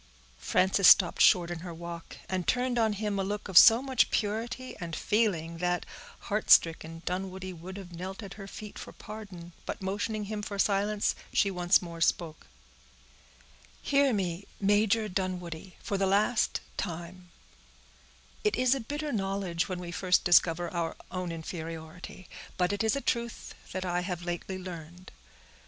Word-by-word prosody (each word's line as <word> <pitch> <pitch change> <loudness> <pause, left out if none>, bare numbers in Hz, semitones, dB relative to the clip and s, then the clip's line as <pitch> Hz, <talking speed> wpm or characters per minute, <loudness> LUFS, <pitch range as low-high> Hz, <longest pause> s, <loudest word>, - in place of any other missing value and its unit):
Frances 185 - +3
stopped 180 -4 +6
short 175 -1 +5
in 175 - -4
her 170 0 -7
walk, 170 0 -8
and 185 -2 -2
turned 250 -1 +1
on 220 -2 +2
him 205 -1 -2
a - - +1
look 205 +2 -3
of 190 - -8
so 225 +7 +9
much 265 -3 +2
purity 230 +4 -2
and 170 -2 -5
feeling, 170 -7 0
that, 175 0 0 0.4
heart 210 +1 -2
stricken, 165 0 +4
Dunwoodie 185 0 -4
would 180 +3 -9
have 190 -3 -9
knelt 190 +5 -6
at 195 - -8
her 195 -1 -9
feet 210 +1 -9
for - - -9
pardon; 190 -6 -10
but - - -4
motioning 205 +3 -2
him 210 +1 -4
for 205 -1 -5
silence, 205 +1 +1 0.2
she 200 - +2
once 180 +1 +3
more 170 -1 -8
spoke:— 160 - 0 1.4
"Hear 280 -1 +3
me, 190 -3 -2
Major 210 +2 +3
Dunwoodie, 180 -2 -4
for 200 - -2
the 195 - +2
last 210 +4 +2 0.2
time: 175 0 -6 1.1
it 210 - +2
is 255 0 +3
a 275 - -1
bitter 290 +5 -4
knowledge 195 -4 -1
when 185 - -3
we 175 -1 -6
first 180 +1 +2
discover 175 0 +3
our 170 -2 -2 0.2
own 185 -2 -3
inferiority; 165 +1 -7 0.3
but 180 +1 +1
it 205 - -1
is 220 - +2
a 280 - -2
truth 235 -3 -2 0.2
that 185 0 -3
I 175 0 0
have 180 -1 -4
lately 175 +2 -4
learned. 175 -1 -9
190 Hz, 160 wpm, -29 LUFS, 175-210 Hz, 1.4 s, so